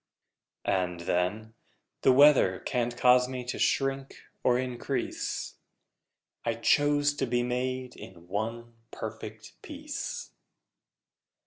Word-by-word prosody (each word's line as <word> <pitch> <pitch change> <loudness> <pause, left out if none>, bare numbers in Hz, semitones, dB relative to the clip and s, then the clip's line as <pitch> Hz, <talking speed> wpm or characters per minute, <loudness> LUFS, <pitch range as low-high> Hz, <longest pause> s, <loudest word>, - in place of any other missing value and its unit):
And, 90 -2 0
then, 90 +6 -1 0.5
The 130 - +5
weather 130 -8 +6
can't 120 -1 -1
cause 125 0 +5
me 125 -1 -5
to 125 - -4
shrink 135 0 0 0.3
or 125 -1 +4
increase: 125 -2 -3 0.9
I 115 -1 0
chose 145 +4 +3
to - - 0
be 120 0 +1
made 125 +1 -2
in 90 -2 -12
one 115 +4 -4 0.2
perfect 110 0 -8
piece! 300 - -6
125 Hz, 105 wpm, -29 LUFS, 110-130 Hz, 0.9 s, weather